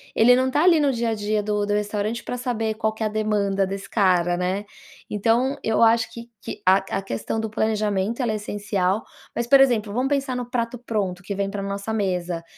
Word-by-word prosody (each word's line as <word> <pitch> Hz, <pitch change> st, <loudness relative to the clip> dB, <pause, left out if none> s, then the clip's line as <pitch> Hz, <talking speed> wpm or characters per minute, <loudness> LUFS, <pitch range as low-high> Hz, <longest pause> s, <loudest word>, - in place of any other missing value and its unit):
ele 245 Hz, +2 st, +6 dB
não 260 Hz, +1 st, +2 dB
está 295 Hz, +5 st, +2 dB
ali 340 Hz, -3 st, +6 dB
no 285 Hz, -2 st, +3 dB
dia 235 Hz, -1 st, -1 dB
a 225 Hz, -, 0 dB
dia 210 Hz, 0 st, -1 dB
do 210 Hz, 0 st, 0 dB
do 205 Hz, -, -1 dB
restaurante, 210 Hz, +2 st, -2 dB
para 250 Hz, -, -4 dB
saber 225 Hz, -3 st, -1 dB
qual 220 Hz, 0 st, -1 dB
que 220 Hz, 0 st, -5 dB
é -, -, +1 dB
a -, -, +1 dB
demanda 205 Hz, -2 st, 0 dB
desse 195 Hz, +1 st, -6 dB
cara, 180 Hz, -4 st, +2 dB
né. 185 Hz, +3 st, -2 dB, 0.4 s
Então 230 Hz, +6 st, +1 dB
eu 220 Hz, -, +1 dB
acho 225 Hz, 0 st, +3 dB
que 235 Hz, 0 st, -10 dB
que -, -, -7 dB
a 185 Hz, +1 st, +6 dB, 0.2 s
a -, -, -2 dB
questão 195 Hz, -, -3 dB
do 220 Hz, 0 st, -2 dB
planejamento 215 Hz, +1 st, 0 dB
ela 240 Hz, -3 st, 0 dB
é -, -, -1 dB
essencial. 205 Hz, -1 st, -1 dB, 0.3 s
Mas, 235 Hz, -, -1 dB
por 275 Hz, +2 st, +7 dB
exemplo 220 Hz, -6 st, +2 dB
vamos 255 Hz, +3 st, 0 dB
pensar 275 Hz, -2 st, 0 dB
no 245 Hz, -1 st, -4 dB
prato 240 Hz, 0 st, -2 dB
pronto 200 Hz, -6 st, -2 dB
que 200 Hz, +1 st, -4 dB
vem 200 Hz, 0 st, -1 dB
para 200 Hz, 0 st, -4 dB
nossa 200 Hz, +2 st, -4 dB
mesa, 180 Hz, -5 st, -1 dB
215 Hz, 225 wpm, -23 LUFS, 200-235 Hz, 0.4 s, por